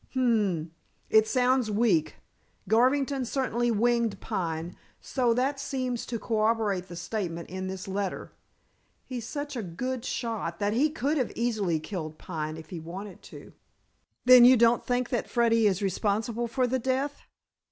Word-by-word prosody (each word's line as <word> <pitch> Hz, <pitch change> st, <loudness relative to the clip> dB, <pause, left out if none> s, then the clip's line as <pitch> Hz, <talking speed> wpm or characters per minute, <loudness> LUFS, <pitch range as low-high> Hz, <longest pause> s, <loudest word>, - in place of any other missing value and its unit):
"Hum! 205 Hz, -11 st, +1 dB, 0.4 s
It 220 Hz, 0 st, +5 dB
sounds 250 Hz, -1 st, +2 dB
weak. 205 Hz, -7 st, +2 dB, 0.5 s
Garvington 265 Hz, +4 st, +2 dB
certainly 240 Hz, -1 st, 0 dB
winged 230 Hz, -2 st, +1 dB
Pine, 165 Hz, -1 st, -3 dB, 0.2 s
so 250 Hz, -3 st, 0 dB
that 270 Hz, +3 st, 0 dB
seems 260 Hz, -4 st, -3 dB
to 235 Hz, -, -3 dB
corroborate 215 Hz, -4 st, 0 dB
the 175 Hz, -, -9 dB
statement 175 Hz, -2 st, -4 dB
in 185 Hz, 0 st, -4 dB
this 190 Hz, 0 st, -6 dB
letter. 195 Hz, 0 st, -3 dB, 0.7 s
He's 240 Hz, -3 st, -6 dB
such 290 Hz, +1 st, -5 dB
a 240 Hz, -, -2 dB
good 235 Hz, +7 st, -4 dB
shot 225 Hz, -10 st, -3 dB
that 205 Hz, +2 st, 0 dB
he 280 Hz, +7 st, +3 dB
could 290 Hz, -2 st, -1 dB
easily 220 Hz, -7 st, 0 dB
have 155 Hz, -, -3 dB
killed 155 Hz, -6 st, -5 dB
Pine 155 Hz, -3 st, -5 dB
if 160 Hz, -1 st, -12 dB
he 175 Hz, -, -5 dB
wanted 185 Hz, +5 st, -8 dB
to." -, -, -12 dB, 0.7 s
"Then 250 Hz, -1 st, +9 dB
you 255 Hz, +1 st, +8 dB
don't 235 Hz, +1 st, +4 dB
think 245 Hz, 0 st, -1 dB
that 240 Hz, -, -2 dB
Freddy 230 Hz, -2 st, +3 dB
is 195 Hz, 0 st, 0 dB
responsible 215 Hz, +4 st, -1 dB
for 250 Hz, +2 st, 0 dB
the 260 Hz, +1 st, 0 dB
death?" 265 Hz, +3 st, -2 dB
230 Hz, 150 wpm, -28 LUFS, 190-250 Hz, 0.7 s, Then